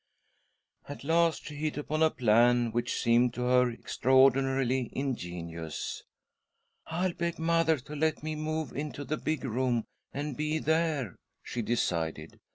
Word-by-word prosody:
At 145 Hz, -, -7 dB
last, 165 Hz, +2 st, +2 dB
she 150 Hz, -, -7 dB
hit 150 Hz, +1 st, -3 dB
upon 155 Hz, +1 st, -2 dB
a 160 Hz, -, +6 dB
plan 120 Hz, -1 st, +3 dB
which 120 Hz, +2 st, -1 dB
seemed 120 Hz, +1 st, +3 dB
to 125 Hz, -, -2 dB
her 125 Hz, 0 st, +4 dB
extraordinarily 130 Hz, +1 st, +2 dB
ingenious. 85 Hz, -, -4 dB, 0.4 s
" -, -, -48 dB
I'll 175 Hz, +2 st, -1 dB
beg 170 Hz, 0 st, -2 dB
mother 165 Hz, -1 st, +2 dB
to 145 Hz, +3 st, -9 dB
let 155 Hz, 0 st, 0 dB
me 155 Hz, 0 st, -2 dB
move 155 Hz, -1 st, -3 dB
into 145 Hz, 0 st, -4 dB
the 155 Hz, +2 st, -2 dB
big 155 Hz, 0 st, -2 dB
room 125 Hz, -2 st, 0 dB, 0.3 s
and 145 Hz, -1 st, -4 dB
he 155 Hz, +1 st, 0 dB
there," 160 Hz, -, 0 dB, 0.3 s
she 120 Hz, -, -4 dB
decided.. 80 Hz, -9 st, -2 dB
135 Hz, 145 wpm, -30 LUFS, 120-155 Hz, 0.4 s, a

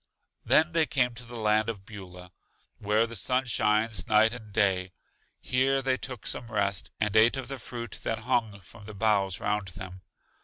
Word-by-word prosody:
Then 160 Hz, +2 st, +4 dB
they 165 Hz, -2 st, +4 dB
came 125 Hz, -3 st, +1 dB
to 120 Hz, +1 st, -10 dB
the 120 Hz, +1 st, -10 dB
land 110 Hz, 0 st, +2 dB
of 100 Hz, -4 st, -6 dB
Beulah, 90 Hz, -4 st, -11 dB, 0.5 s
where 105 Hz, +2 st, +2 dB
the 115 Hz, 0 st, -8 dB
sun 125 Hz, +6 st, 0 dB
shines 110 Hz, -4 st, +1 dB
night 110 Hz, +1 st, +4 dB
and 110 Hz, -4 st, -10 dB
day. 95 Hz, -3 st, +1 dB, 0.5 s
Here 135 Hz, +1 st, +1 dB
they 130 Hz, 0 st, +2 dB
took 125 Hz, -5 st, -6 dB
some 120 Hz, -1 st, -4 dB
rest, 100 Hz, -3 st, 0 dB
and 105 Hz, -1 st, 0 dB
ate 115 Hz, +4 st, +5 dB
of 135 Hz, -, -5 dB
the 135 Hz, -1 st, -5 dB
fruit 120 Hz, -1 st, -7 dB
that 115 Hz, -, -2 dB
hung 105 Hz, -4 st, 0 dB
from 105 Hz, +3 st, -14 dB
the 110 Hz, 0 st, -9 dB
boughs 100 Hz, -3 st, +1 dB
round 105 Hz, -1 st, -1 dB
them. 95 Hz, 0 st, -9 dB
110 Hz, 185 wpm, -28 LUFS, 100-120 Hz, 0.5 s, ate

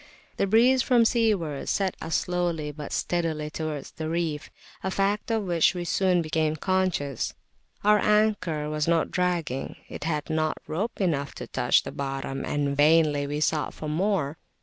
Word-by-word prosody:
The 195 Hz, -, +1 dB
breeze 245 Hz, +5 st, +5 dB
from 245 Hz, -3 st, +4 dB
seaward 205 Hz, -, +1 dB
set 195 Hz, -2 st, +1 dB
us 160 Hz, 0 st, -2 dB
slowly 175 Hz, -4 st, -1 dB
but 150 Hz, -1 st, -8 dB
steadily 160 Hz, -3 st, -1 dB
towards 155 Hz, -3 st, -4 dB
the 155 Hz, 0 st, -5 dB
reef, 160 Hz, -3 st, -2 dB, 0.3 s
a 190 Hz, -, 0 dB
fact 200 Hz, +3 st, 0 dB
of 225 Hz, -2 st, +1 dB
which 175 Hz, -1 st, +2 dB
we 175 Hz, -1 st, -3 dB
soon 180 Hz, -1 st, +2 dB
became 155 Hz, 0 st, 0 dB
conscious. 180 Hz, -, -1 dB, 0.5 s
Our 210 Hz, 0 st, +5 dB
anchor 205 Hz, -8 st, +2 dB
was 150 Hz, 0 st, -1 dB
not 165 Hz, -1 st, +2 dB
dragging; 170 Hz, -7 st, -1 dB
it 145 Hz, -, -6 dB
had 150 Hz, -2 st, -1 dB
not 155 Hz, 0 st, 0 dB
rope 195 Hz, +9 st, -3 dB
enough 150 Hz, -7 st, -1 dB
to -, -, -6 dB
touch -, -, +2 dB
the -, -, -6 dB
bottom, 135 Hz, -1 st, -4 dB
and 145 Hz, -1 st, -1 dB
vainly 150 Hz, -1 st, +4 dB
we 145 Hz, +1 st, -3 dB
sought 155 Hz, -1 st, 0 dB
for 155 Hz, -, -6 dB
more. 160 Hz, -2 st, 0 dB
165 Hz, 165 wpm, -26 LUFS, 150-190 Hz, 0.5 s, breeze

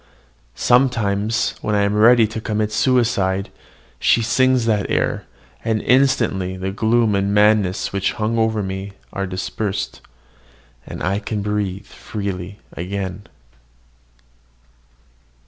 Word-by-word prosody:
Sometimes, 115 Hz, -4 st, +2 dB
when 105 Hz, -, -1 dB
I 100 Hz, -, +3 dB
am 100 Hz, 0 st, +1 dB
ready 115 Hz, +2 st, +6 dB
to 110 Hz, +1 st, -5 dB
commit 110 Hz, -1 st, -1 dB
suicide, 110 Hz, -7 st, +1 dB, 0.5 s
she 115 Hz, -, +3 dB
sings 130 Hz, +1 st, +2 dB
that 105 Hz, -3 st, 0 dB
air; -, -, 0 dB, 0.4 s
and 110 Hz, -1 st, 0 dB
instantly 110 Hz, -8 st, +2 dB
the 95 Hz, +1 st, -3 dB
gloom 110 Hz, +2 st, +2 dB
and 100 Hz, 0 st, +1 dB
madness 105 Hz, -3 st, +2 dB
which 100 Hz, 0 st, 0 dB
hung 115 Hz, 0 st, -1 dB
over 110 Hz, -2 st, +1 dB
me 95 Hz, +1 st, -5 dB, 0.2 s
are 100 Hz, 0 st, -2 dB
dispersed, 95 Hz, +2 st, -4 dB, 0.9 s
and -, -, -7 dB
I 100 Hz, +2 st, 0 dB
breathe 105 Hz, -2 st, -3 dB
freely 100 Hz, -2 st, -6 dB, 0.2 s
again. 95 Hz, +2 st, -5 dB
105 Hz, 110 wpm, -20 LUFS, 100-115 Hz, 0.9 s, ready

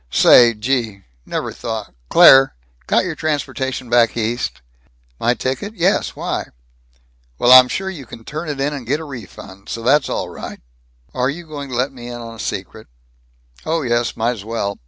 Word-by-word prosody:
"Say! 120 Hz, -, +6 dB
Gee! 110 Hz, -3 st, -2 dB, 0.2 s
Never -, -, -3 dB
thought 110 Hz, -3 st, -6 dB, 0.2 s
Claire! 135 Hz, 0 st, +7 dB, 0.3 s
Got -, -, +2 dB
your 175 Hz, -, -3 dB
transportation 140 Hz, -4 st, -3 dB
back 120 Hz, -1 st, +3 dB
East?" 115 Hz, -, -2 dB, 0.6 s
"My 120 Hz, +1 st, +2 dB
ticket? 135 Hz, -, -4 dB
Yes. 185 Hz, +1 st, +1 dB
Why?" -, -, -3 dB, 0.9 s
"Well, 120 Hz, -, +3 dB
I'm 130 Hz, 0 st, +10 dB
sure 190 Hz, +8 st, -3 dB
you 155 Hz, -10 st, -7 dB
can 115 Hz, -, -11 dB
turn 155 Hz, +6 st, -6 dB
it 145 Hz, -2 st, -4 dB
in 145 Hz, +2 st, 0 dB
and 135 Hz, -5 st, -7 dB
get 145 Hz, +4 st, 0 dB
a -, -, -7 dB
refund. 105 Hz, -7 st, -11 dB
So 115 Hz, -, -5 dB
that's 140 Hz, +4 st, +3 dB
all -, -, -2 dB
right." -, -, -8 dB, 0.5 s
"Are 125 Hz, +1 st, 0 dB
you 170 Hz, +5 st, -6 dB
going 145 Hz, -3 st, -7 dB
to 125 Hz, -, -5 dB
let 130 Hz, +3 st, 0 dB
me 120 Hz, -2 st, -10 dB
in 120 Hz, -, -6 dB
on 115 Hz, -1 st, -8 dB
the 115 Hz, -, -13 dB
secret?" -, -, -5 dB, 0.8 s
"Oh 160 Hz, 0 st, -1 dB
yes, 120 Hz, -1 st, 0 dB
might's 115 Hz, -2 st, -1 dB
well. 100 Hz, -2 st, -3 dB
125 Hz, 180 wpm, -19 LUFS, 115-145 Hz, 0.9 s, I'm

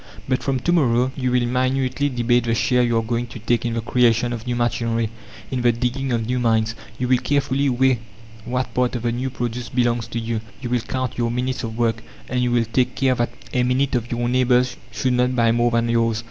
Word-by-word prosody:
"But 130 Hz, -1 st, 0 dB
from 135 Hz, -2 st, 0 dB
to 170 Hz, -, +1 dB
morrow 130 Hz, -6 st, +3 dB
you 130 Hz, -2 st, -1 dB
will 125 Hz, -1 st, +2 dB
minutely 130 Hz, +2 st, 0 dB
debate 120 Hz, -1 st, +1 dB
the 115 Hz, -1 st, +1 dB
share 125 Hz, +2 st, +2 dB
you 120 Hz, -1 st, +2 dB
are 115 Hz, -, +1 dB
going 120 Hz, +2 st, -2 dB
to 120 Hz, -, -9 dB
take 120 Hz, +2 st, 0 dB
in 115 Hz, -, -2 dB
the 115 Hz, -, -1 dB
creation 120 Hz, 0 st, +2 dB
of 115 Hz, +1 st, -6 dB
new 120 Hz, -, 0 dB
machinery, 115 Hz, -2 st, 0 dB, 0.4 s
in 130 Hz, -2 st, -1 dB
the 120 Hz, 0 st, +4 dB
digging 125 Hz, +3 st, -2 dB
of 115 Hz, -2 st, 0 dB
new 125 Hz, +2 st, -1 dB
mines. 110 Hz, -2 st, +2 dB, 0.2 s
You 125 Hz, -, -1 dB
will 125 Hz, 0 st, +3 dB
carefully 140 Hz, +1 st, +1 dB
weigh 130 Hz, -1 st, +2 dB, 0.4 s
what 125 Hz, +2 st, -2 dB
part 125 Hz, 0 st, +1 dB
of 120 Hz, -, -4 dB
the 120 Hz, -, +1 dB
new 125 Hz, +3 st, -2 dB
produce 120 Hz, -1 st, -4 dB
belongs 120 Hz, -2 st, 0 dB
to 115 Hz, 0 st, -3 dB
you. 115 Hz, -1 st, -2 dB, 0.2 s
You 125 Hz, -2 st, -5 dB
will 125 Hz, -, +2 dB
count 130 Hz, +1 st, -3 dB
your 120 Hz, -1 st, +1 dB
minutes 125 Hz, +2 st, -2 dB
of 110 Hz, -1 st, -5 dB
work, 115 Hz, -1 st, +1 dB, 0.3 s
and 125 Hz, 0 st, -1 dB
you 125 Hz, -, +1 dB
will 120 Hz, -1 st, +2 dB
take 125 Hz, +3 st, 0 dB
care 130 Hz, -1 st, +2 dB
that 120 Hz, -1 st, 0 dB, 0.2 s
a 125 Hz, -, +2 dB
minute 130 Hz, +2 st, +1 dB
of 120 Hz, -2 st, -1 dB
your 120 Hz, 0 st, -1 dB
neighbours 125 Hz, 0 st, +2 dB, 0.2 s
should 130 Hz, -1 st, 0 dB
not 125 Hz, +1 st, +2 dB
buy 115 Hz, -2 st, +3 dB
more 120 Hz, +1 st, +2 dB
than 115 Hz, 0 st, +1 dB
yours. 115 Hz, -1 st, +1 dB
120 Hz, 235 wpm, -22 LUFS, 115-125 Hz, 0.4 s, the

